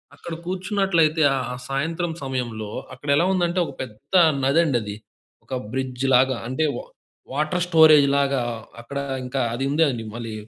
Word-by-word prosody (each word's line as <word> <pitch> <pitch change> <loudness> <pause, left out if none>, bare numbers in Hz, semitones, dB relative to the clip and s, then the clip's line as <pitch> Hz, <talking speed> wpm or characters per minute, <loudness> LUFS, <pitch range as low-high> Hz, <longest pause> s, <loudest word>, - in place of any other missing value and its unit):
అక్కడ 170 - -8
కూర్చున్నట్లయితే 185 -4 +1 0.3
ఆ - - -5
సాయంత్రం 165 +5 -1
సమయంలో 120 -5 -4 0.2
అక్కడెలా 140 +5 +1
ఉందంటే 175 -1 +1
ఒక 140 - -7
పెద్ద 110 - -14 0.3
నది 140 +5 +3
అండి 135 -6 +1
అది. 105 0 -6 0.5
ఒక - - -8 0.2
బ్రిడ్జ్‌లాగా 130 0 +2
అంటే 155 +5 0
వా - - -6 0.5
వాటర్ 155 +5 0
స్టోరేజ్‌లాగా 140 -5 +5 0.4
అక్కడ 140 +4 -5 0.3
ఇంకా 125 +2 -3
అది 130 - -3
ఉందండి. 140 -7 +1
మళ్ళీ 115 -2 -6
140 Hz, 130 wpm, -23 LUFS, 130-165 Hz, 0.5 s, స్టోరేజ్‌లాగా